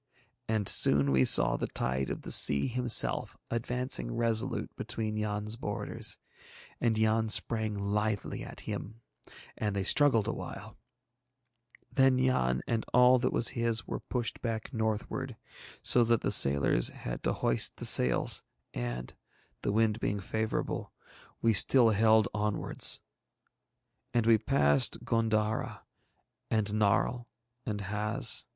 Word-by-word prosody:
And 110 -3 -1
soon 70 0 +7
we 65 -1 +3
saw - - +4
the - - -3
tide 65 +1 -2
of - - -6
the - - -6
Sea 70 -1 +6
himself 125 -1 0
advancing 120 - -2
resolute 115 -2 -2
between 110 -1 -4
Yann's 105 +1 -3
borders, 105 -4 -4 0.6
and 115 -3 0
Yann 110 0 +1
sprang 110 -1 0
lithely 105 +1 -2
at - - -10
him 110 +3 -7 0.5
and 105 -2 -3
they 100 - -1
struggled 115 -1 +4
awhile; 105 0 -7 1.2
then 135 -1 +3
Yann 95 - 0
and 115 -1 -2
all 125 0 +6
that 125 - -1
was 120 - +1
his 115 -2 -1
were - - -5
pushed 120 -3 -4
back 115 +2 -5
northward, 110 +3 -3 0.5
so 120 - +4
that 115 -1 +1
the - - -1
sailors 70 -3 +3
had - - -7
to - - -1
hoist - - 0
the - - -5
sails 60 -1 +2 0.3
and, - - -5 0.5
the - - -1
wind 110 +1 +1
being 100 -2 -2
favourable, 110 +3 -4 0.5
we 115 -1 +3
still 115 +3 +4
held 110 0 +3
onwards. 105 -1 0 1.1
And 120 -2 +2
we 115 -1 +4
passed 70 - +1
G├│ndara 110 -1 -1 0.7
and 110 -2 0
Narl 105 +3 0 0.4
and 105 -2 -3
Haz. 105 +4 -1
110 Hz, 130 wpm, -29 LUFS, 100-115 Hz, 1.2 s, soon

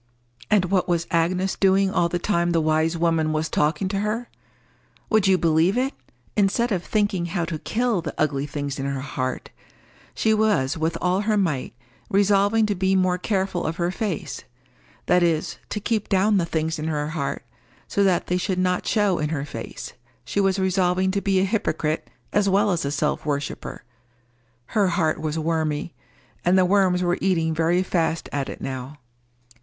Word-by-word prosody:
And 205 -4 +4
what 185 0 +1
was 170 -1 +1
Agnes 180 +3 +1
doing 195 0 +3
all 170 -3 +2
the 175 - -1
time 175 -2 0
the 165 - +3
wise 160 +1 +1
woman 165 -2 +1
was 155 0 -1
talking 155 +6 +1
to 195 0 -1
her? 215 +4 -2 0.8
Would 215 -2 +4
you 190 -1 +5
believe 165 +5 +2
it?—instead 235 -3 -1
of 180 -4 0
thinking 205 -5 0
how 175 0 -1
to 165 -2 -4
kill 230 -2 0
the 160 -2 -6
ugly 145 -2 0
things 145 -1 -4
in 135 - -2
her 135 -1 -2
heart, 130 -1 -4 0.6
she 220 - +2
was 210 -11 +2
with 160 +1 -1
all 180 +2 +1
her 210 0 +1
might 150 - -1 0.3
resolving 205 +2 +3
to 210 - 0
be 190 0 +1
more 185 -1 +2
careful 190 -2 -1
of 160 - -2
her 175 0 -1
face, 195 -4 -4 0.6
that 180 - +3
is, 165 -2 0
to 210 - -3
keep 215 0 -1
down 200 +1 +3
the 170 -3 0
things 160 0 -1
in 155 - -3
her 150 -1 -1
heart 155 -3 -3 0.4
so 200 - +1
that 185 -3 +2
they 180 - 0
should 185 0 -1
not 180 0 0
show 205 -5 +2
in 150 0 -1
her 145 -3 -2
face, - - -7 0.3
she - - -2
was 195 -1 +2
resolving 185 0 +1
to 200 +1 -1
be 195 -1 +2
a 190 - +3
hypocrite 160 -7 -1 0.2
as 205 -1 +3
well 200 +1 +3
as 170 -2 0
a 140 - -2
self 150 0 -1
worshipper. 145 -1 -4 0.9
Her 205 -3 +3
heart 165 -3 0
was 155 0 -2
wormy, 160 -1 -1 0.5
and 180 +2 +4
the 185 - +5
worms 185 -1 +3
were 175 0 0
eating 165 -4 +1
very 165 +3 +2
fast 165 -3 -1
at 140 -2 -2
it - - -8
now. 130 +2 -5
180 Hz, 180 wpm, -23 LUFS, 160-195 Hz, 0.9 s, you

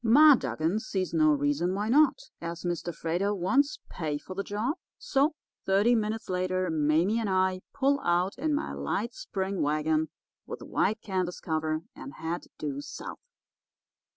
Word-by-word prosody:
Ma 290 +7 +8
Dugan 160 - 0
sees 190 -5 -3
no 155 -2 +5
reason 145 +5 +1
why 205 +2 -1
not, 305 - +3
as 170 0 -5
Mr. 175 0 -2
Freighter 175 +6 -1
wants 275 +11 +2
pay 155 -4 -3
for 165 +5 -9
the 195 - -2
job; 215 +8 -1 0.2
so, 300 - +1 0.3
thirty 200 +5 +4
minutes 220 -1 -1
later 185 -1 0
Mame 160 +8 +2
and 220 -3 -1
I 185 0 +2
pull 280 +1 +2
out 175 0 +1
in 300 +4 0
my 295 - -2
light - - -2
spring 195 - -3
wagon 155 +1 +1 0.4
with - - -6
white 215 +2 0
canvas 185 -3 -2
cover, 155 0 -1
and 275 - -9
head 165 +2 -4
due 145 -2 -3
south. - - -8
185 Hz, 155 wpm, -29 LUFS, 160-225 Hz, 0.4 s, Ma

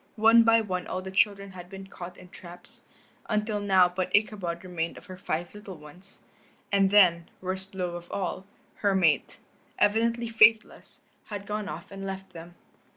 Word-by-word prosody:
One 225 +2 +6
by 230 0 +5
one 185 -4 -4
all 185 0 -4
the 190 - -7
children 200 0 +1
had 180 -1 -11
been 195 0 -9
caught 180 -2 -10
in 180 - -14
traps, 175 0 -13 0.5
until 215 -1 0
now 190 -3 +4
but 180 +1 -3
Ichabod 195 -5 -1
remained 170 -2 -4
of - - -13
her 185 - -9
five 175 -1 -4
little 205 -3 -10
ones. 155 +6 -16 0.5
And 195 -1 +3
then, 180 -5 +4
worst 190 +1 -5
blow 180 -2 -3
of 175 0 -9
all, 190 0 -4 0.3
her 200 -2 +1
mate, 160 -7 +2 0.4
evidently 230 +3 +1
faithless, 220 -1 +3 0.2
had 205 -2 -7
gone 210 0 -4
off 160 +5 -8
and 195 0 -8
left 195 0 -7
them. 170 +1 -11
190 Hz, 170 wpm, -27 LUFS, 180-210 Hz, 0.5 s, One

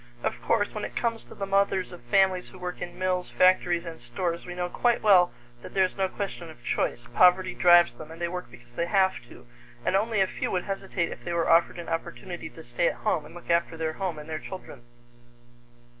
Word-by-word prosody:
Of - - -2
course, - - +1
when - - -4
it - - -5
comes 230 -1 -1
to - - -13
the 195 - -3
mothers 195 -1 +1
of 180 - -10
families 185 +8 +2
who - - -13
work 180 -1 -6
in 175 0 -6
mills, 185 -1 -1
factories, 180 -1 +3
and 165 -5 -8
stores, 170 +9 -3
we 175 - -6
know 180 0 -1
quite 240 +6 +1
well 185 -4 +6 0.3
that - - -11
there 190 - +5
is 185 - -5
no 195 -1 +1
question 190 -4 -5
of 120 -7 -14
choice 120 - -1
poverty 180 +5 +5
drives 175 -7 +6
them, 150 +6 -11
and 165 +1 -10
they 170 - 0
work 180 -3 -5
because 120 0 -17
they 170 +6 -1
have 190 0 +3 0.2
to, - - -14 0.4
and - - +2
only 215 +2 +1
a 190 - +5
few - - -3
would 180 - -1
hesitate 195 -3 -2
if - - -9
they 175 - -3
were 170 -1 +1
offered 165 +1 +4
an 170 - -7
opportunity 165 +1 -5
to 160 - -12
stay 120 +8 0
at - - 0
home 160 -8 +1
and 165 - -15
look 175 - -5
after 170 -1 +1
their 160 -1 -2
home 185 -2 -3
and 150 - -9
their 155 -1 -4
children. 185 -9 -9
175 Hz, 235 wpm, -27 LUFS, 165-190 Hz, 0.4 s, well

